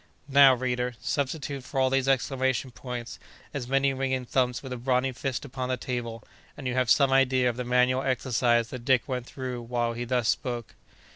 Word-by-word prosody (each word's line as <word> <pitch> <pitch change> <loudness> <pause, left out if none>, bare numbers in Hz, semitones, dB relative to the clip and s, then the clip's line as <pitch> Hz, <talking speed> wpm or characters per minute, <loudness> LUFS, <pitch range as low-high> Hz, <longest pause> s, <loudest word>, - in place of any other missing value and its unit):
Now, 140 -2 +7
reader, 125 -1 -2
substitute 140 -1 -2
for 135 +2 -3
all 130 0 +3
these 135 0 +1
exclamation 130 -1 +1
points, 120 +1 -7 0.3
as 135 -4 -4
many 135 +1 +2
ringing 130 -1 -1
thumps 125 0 0
with 130 -2 -5
a - - -4
brawny 125 +2 +1
fist 130 +1 -4
upon 130 -1 -4
the 130 - 0
table, 115 -3 -4 0.3
and 145 - -8
you 125 - -1
have 130 -2 +1
some 140 -2 +5
idea 130 -1 +3
of 120 - 0
the 125 - -3
manual 125 +1 +2
exercise 120 -3 +1
that 125 -2 -7
Dick 130 -2 +2
went 125 -2 -3
through 125 -2 -5
while 120 0 -1
he 120 +1 -4
thus 120 -2 0
spoke. 120 -1 -2
130 Hz, 195 wpm, -27 LUFS, 125-135 Hz, 0.3 s, Now